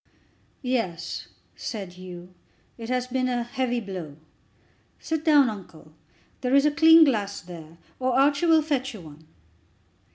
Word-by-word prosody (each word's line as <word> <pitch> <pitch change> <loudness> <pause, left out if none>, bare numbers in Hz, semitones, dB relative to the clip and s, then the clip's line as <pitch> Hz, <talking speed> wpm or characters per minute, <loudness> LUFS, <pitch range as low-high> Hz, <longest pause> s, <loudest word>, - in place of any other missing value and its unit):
"Yes," 230 -10 -3 0.3
said 195 -6 -6
Hugh, 180 0 -11 0.4
"it 230 -1 -8
has 250 0 0
been 255 0 -1
a 245 -1 -1
heavy 245 0 -2
blow. 180 -9 -7 0.8
Sit 320 -1 -3
down, 295 -4 +5
uncle. 180 -7 -9 0.5
There 255 +1 +1
is 280 +1 +5
a 300 - +4
clean 320 +2 +7
glass 210 -8 0
there; 170 -3 -12 0.2
or 255 0 +1
Archie 285 +4 +3
will 320 -1 +5
fetch 270 -4 -2
you 205 - -10
one." 155 -1 -14
245 Hz, 140 wpm, -25 LUFS, 180-275 Hz, 0.8 s, clean